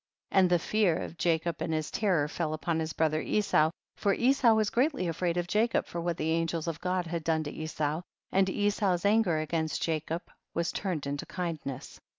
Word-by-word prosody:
55. -, -, +3 dB
And 185 Hz, -, +4 dB
the 175 Hz, -, +5 dB
fear 195 Hz, 0 st, +2 dB
of 165 Hz, -, -8 dB
Jacob 170 Hz, -1 st, 0 dB
and 160 Hz, -, -1 dB
his 155 Hz, -1 st, -2 dB
terror 180 Hz, -9 st, +2 dB
fell 155 Hz, 0 st, -2 dB
upon 160 Hz, +1 st, -1 dB
his 160 Hz, 0 st, -2 dB
brother 155 Hz, -1 st, +1 dB
Esau, 195 Hz, -7 st, +2 dB, 0.3 s
for 200 Hz, -1 st, +1 dB
Esau 245 Hz, -2 st, +4 dB
was 215 Hz, -1 st, +1 dB
greatly 260 Hz, -, +1 dB
afraid 170 Hz, +1 st, -1 dB
of 175 Hz, -, 0 dB
Jacob 220 Hz, +5 st, +2 dB
for 170 Hz, -, -5 dB
what 170 Hz, -1 st, -1 dB
the 160 Hz, +1 st, 0 dB
angels 165 Hz, 0 st, 0 dB
of 165 Hz, -1 st, -3 dB
God 180 Hz, -1 st, 0 dB
had 165 Hz, -1 st, -3 dB
done 160 Hz, -1 st, +1 dB
to 145 Hz, -, -5 dB
Esau, 155 Hz, 0 st, -2 dB, 0.3 s
and 190 Hz, 0 st, +3 dB
Esau's 200 Hz, -2 st, +1 dB
anger 205 Hz, -5 st, +3 dB
against 160 Hz, +1 st, -1 dB
Ja 160 Hz, -1 st, +1 dB
cob 165 Hz, +3 st, -4 dB, 0.3 s
was 170 Hz, 0 st, 0 dB
turned 180 Hz, -8 st, -2 dB
into 140 Hz, 0 st, -4 dB
kindness. 165 Hz, -7 st, -5 dB
170 Hz, 200 wpm, -29 LUFS, 160-195 Hz, 0.3 s, the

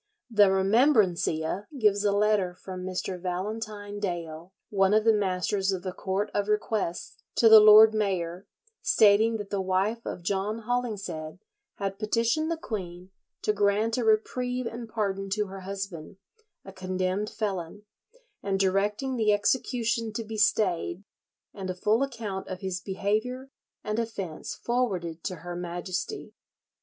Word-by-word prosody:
"[62:1] -, -, -13 dB
The 205 Hz, -2 st, +7 dB
"Remembrancia" 195 Hz, -, +2 dB
gives 205 Hz, -2 st, +3 dB
a 205 Hz, -, +3 dB
letter 200 Hz, -3 st, +2 dB
from 185 Hz, 0 st, -8 dB
Mr. 185 Hz, 0 st, -4 dB
Valentine 205 Hz, +3 st, -4 dB
Dale, 170 Hz, -3 st, -4 dB, 0.2 s
one 195 Hz, 0 st, +3 dB
of 215 Hz, -, +4 dB
the 225 Hz, 0 st, +5 dB
masters 195 Hz, 0 st, 0 dB
of 185 Hz, -2 st, -3 dB
the 185 Hz, -, -3 dB
Court 195 Hz, +3 st, -2 dB
of 205 Hz, 0 st, 0 dB
Requests, 210 Hz, -1 st, -2 dB
to 230 Hz, -, +5 dB
the 220 Hz, -1 st, +11 dB
lord 215 Hz, +1 st, +9 dB
mayor, 185 Hz, -4 st, -2 dB, 0.3 s
stating 225 Hz, -, +4 dB
that 205 Hz, -2 st, -8 dB
the 200 Hz, -1 st, 0 dB
wife 190 Hz, +5 st, 0 dB
of 175 Hz, -, -6 dB
John 205 Hz, +4 st, -2 dB
Hollingshead 205 Hz, -10 st, -3 dB, 0.4 s
had 195 Hz, 0 st, -4 dB
petitioned 230 Hz, +8 st, +1 dB
the 335 Hz, -, -1 dB
queen 185 Hz, -, -6 dB, 0.3 s
to 210 Hz, -, +2 dB
grant 210 Hz, +2 st, +1 dB
a -, -, 0 dB
reprieve 250 Hz, +3 st, +1 dB
and 230 Hz, 0 st, -6 dB
pardon 195 Hz, -3 st, -2 dB
to 210 Hz, -1 st, 0 dB
her 195 Hz, 0 st, -8 dB
husband, 190 Hz, -3 st, -6 dB, 0.5 s
a 195 Hz, -, -10 dB
condemned 185 Hz, +2 st, -2 dB
felon, 200 Hz, -2 st, -4 dB, 0.6 s
and 195 Hz, -1 st, -1 dB
directing 205 Hz, +7 st, 0 dB
the 215 Hz, -2 st, +3 dB
execution 230 Hz, +1 st, 0 dB
to 230 Hz, -, -3 dB
be 220 Hz, 0 st, -7 dB
stayed, 195 Hz, -3 st, +1 dB, 0.5 s
and 190 Hz, -2 st, -6 dB
a 185 Hz, -, -2 dB
full 210 Hz, +6 st, +1 dB
account 225 Hz, -8 st, -4 dB
of 185 Hz, -1 st, -6 dB
his 190 Hz, -2 st, -3 dB
behaviour 220 Hz, +7 st, -2 dB, 0.3 s
and 215 Hz, +1 st, -2 dB
offence 195 Hz, -8 st, -5 dB
forwarded 185 Hz, -10 st, -2 dB
to 185 Hz, -, -2 dB
her 175 Hz, 0 st, -5 dB
Majesty. 175 Hz, -, -5 dB
205 Hz, 150 wpm, -27 LUFS, 185-220 Hz, 0.6 s, the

